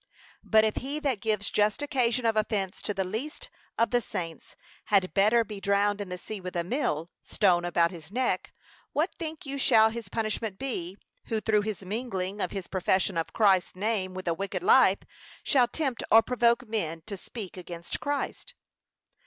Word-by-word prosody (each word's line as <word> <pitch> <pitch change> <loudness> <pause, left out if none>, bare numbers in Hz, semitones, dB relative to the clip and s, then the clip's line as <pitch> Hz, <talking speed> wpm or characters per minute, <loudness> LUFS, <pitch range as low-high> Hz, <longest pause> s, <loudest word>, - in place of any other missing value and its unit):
But 220 -1 +5
if 215 - -1
he 280 +3 -3
that 265 -9 0
gives 210 -2 0
just 210 +7 +2
occasion 250 -4 +1
of 225 -1 +3
offence 210 -3 -1
to - - -2
the 195 -1 -1
least 225 +11 -5 0.3
of 230 - +2
the 245 -1 +3
saints 170 -7 -6 0.3
had 195 -3 +2
better 215 +4 +4
be 210 -2 -8
drowned 200 +1 +2
in 200 - -5
the 180 - -4
sea 205 +2 -7
with 180 0 -6
a 170 - +1
mill 175 - -1
stone 180 -4 +2
about 170 -1 +2
his 165 -1 -10
neck; 250 +3 -1 0.4
what 310 +6 +1
think 315 -2 -6
you 280 0 -4
shall 220 -4 +5
his 225 -4 -7
judgment 215 -2 -2
be, 195 -8 -4 0.3
who, 225 - -1
through 215 -1 +2
his 210 -2 -4
mingling 200 -2 -3
of - - 0
his 195 -3 -5
profession 190 0 +1
of 165 -1 -2
Christ's 195 -5 +3
name 190 -2 -1
with 185 -1 -6
a 170 - +3
wicked 195 - -4
life 440 +5 +5 0.4
shall 255 -4 +4
tempt 265 -1 -2
or 225 +1 +8
provoke 235 0 +2
men 165 -7 -3
to 210 - -5
speak 195 0 -8
against 175 -2 -6
Christ? 290 - -3
210 Hz, 185 wpm, -28 LUFS, 185-235 Hz, 0.4 s, or